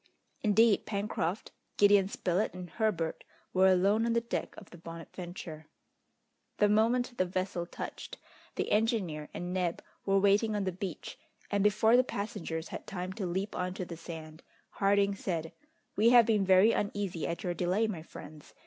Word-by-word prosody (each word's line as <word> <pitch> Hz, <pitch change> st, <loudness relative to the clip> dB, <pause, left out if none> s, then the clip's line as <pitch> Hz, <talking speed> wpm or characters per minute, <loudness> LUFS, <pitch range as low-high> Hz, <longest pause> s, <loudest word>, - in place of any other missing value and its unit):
Indeed 215 Hz, 0 st, +4 dB
Pencroft, 200 Hz, -3 st, -2 dB, 0.3 s
Gideon 205 Hz, -1 st, +5 dB
Spilett, 185 Hz, 0 st, -1 dB
and 180 Hz, -2 st, -8 dB
Herbert 185 Hz, -7 st, -1 dB, 0.3 s
were 185 Hz, +1 st, +5 dB
alone 195 Hz, +4 st, +3 dB
on 230 Hz, 0 st, +1 dB
the 235 Hz, -, +2 dB
deck 235 Hz, -, -4 dB
of 205 Hz, -, -12 dB
the 175 Hz, -, -11 dB
Bonadventure. 165 Hz, -1 st, -8 dB, 0.9 s
The 210 Hz, -, +4 dB
moment 235 Hz, +4 st, +2 dB
the 185 Hz, -, +3 dB
vessel 185 Hz, -1 st, -3 dB
touched, -, -, -7 dB, 0.4 s
the -, -, -2 dB
engineer 205 Hz, -9 st, 0 dB
and 175 Hz, +1 st, -5 dB
Neb 180 Hz, -2 st, -1 dB, 0.2 s
were 195 Hz, 0 st, +2 dB
waiting 205 Hz, +2 st, +3 dB
on 205 Hz, -, 0 dB
the 190 Hz, -, -1 dB
beach, 185 Hz, -1 st, -6 dB, 0.3 s
and 200 Hz, -1 st, +2 dB
before 215 Hz, +3 st, +4 dB
the 255 Hz, -, +6 dB
passengers 200 Hz, -8 st, -4 dB
had -, -, -7 dB
time 185 Hz, -2 st, -4 dB
to 195 Hz, -2 st, -3 dB
leap 190 Hz, +4 st, -3 dB
on 180 Hz, 0 st, -2 dB
to 185 Hz, -, -4 dB
the 170 Hz, -, -7 dB
sand, 160 Hz, -1 st, -9 dB, 0.3 s
Harding 200 Hz, 0 st, +2 dB
said: 165 Hz, -5 st, -4 dB, 0.4 s
"We 220 Hz, +3 st, +5 dB
have 240 Hz, -1 st, +7 dB
been 210 Hz, -3 st, +2 dB
very 190 Hz, +4 st, +6 dB
uneasy 200 Hz, -6 st, -2 dB
at 170 Hz, -, -4 dB
your 180 Hz, -, -1 dB
delay, 180 Hz, +5 st, +1 dB
my 200 Hz, -7 st, -4 dB
friends! 155 Hz, -2 st, -12 dB
195 Hz, 165 wpm, -31 LUFS, 175-210 Hz, 0.9 s, have